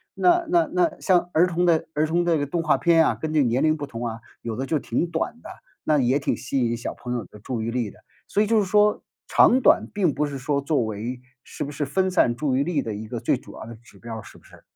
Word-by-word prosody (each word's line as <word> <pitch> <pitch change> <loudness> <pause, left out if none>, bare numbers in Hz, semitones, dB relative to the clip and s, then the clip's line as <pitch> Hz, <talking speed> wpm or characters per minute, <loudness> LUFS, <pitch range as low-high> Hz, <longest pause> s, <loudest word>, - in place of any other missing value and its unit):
那 350 -1 +3
那 340 -1 +3
那 350 -4 +1
像 180 -4 +2
儿 165 +3 +5
童 175 0 0
的 165 -2 +3
儿 155 +1 +1
童 170 +2 +1
这 170 -2 +2
个 145 - -1
动 165 +4 -2
画 160 - +3
片 165 -2 +4
啊， - - +2
跟 160 - -5
这 155 -2 +3
年 120 +1 +1
龄 155 0 +3
不 145 - -4
同 120 -2 -5
啊， 115 0 -6 0.2
有 115 -2 -4
的 130 - -3
就 155 +2 0
挺 125 +5 -1
短 160 - -2
的， - - -9 0.3
那 150 -1 +2
也 130 +1 +2
挺 140 - -1
吸 135 +1 -3
引 115 - -1
小 120 - -5
朋 125 - -6
友 120 - -2
的 - - -15
注 115 +2 -4
意 110 - -2
力 115 -3 -2
的， - - -20 0.3
所 205 - +1
以 215 - +2
就 225 0 +3
是 205 - +1
说 210 +2 +3 0.3
长 255 - +5
短 - - +4
并 185 -8 +1
不 150 +1 -1
是 140 -1 -5
说 140 +2 -1
作 140 -1 0
为 110 +4 -5 0.2
是 - - -6
不 145 - -5
是 145 0 -3
分 185 +7 0
散 120 -9 +3
注 135 0 -1
意 135 - +2
力 150 -3 -1
的 110 - -4
一 105 +1 -7
个 120 +1 -5
最 - - +1
主 - - -13
要 - - -9
的 115 - -9
指 115 +2 -19
标 115 -1 -7
儿， - - -10
是 - - -14
不 - - -21
是？ - - -18
145 Hz, 305 characters per minute, -24 LUFS, 120-175 Hz, 0.3 s, 儿